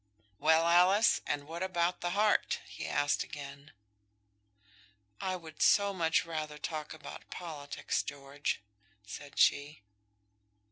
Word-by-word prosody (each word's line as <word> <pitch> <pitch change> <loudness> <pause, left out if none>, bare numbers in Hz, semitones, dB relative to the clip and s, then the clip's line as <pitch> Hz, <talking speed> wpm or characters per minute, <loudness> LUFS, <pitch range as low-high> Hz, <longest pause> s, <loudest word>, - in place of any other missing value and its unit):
"Well, 160 +2 +4
Alice, 185 +6 +5
and 145 -1 -1
what 165 +2 -6
about 180 -1 0
the 175 - -1
heart?" 210 0 +2
he - - -7
asked 145 0 +1
again. 140 0 -9 1.5
"I 185 -1 -1
would 160 -3 -10
so 200 -1 +5
much 165 -3 +2
rather 155 -2 -4
talk 155 0 -5
about 155 - -10
politics, 150 -5 -3
George," 140 -2 -4 0.4
said 140 +6 -9
she. 145 -4 +2
160 Hz, 120 wpm, -32 LUFS, 145-175 Hz, 1.5 s, Alice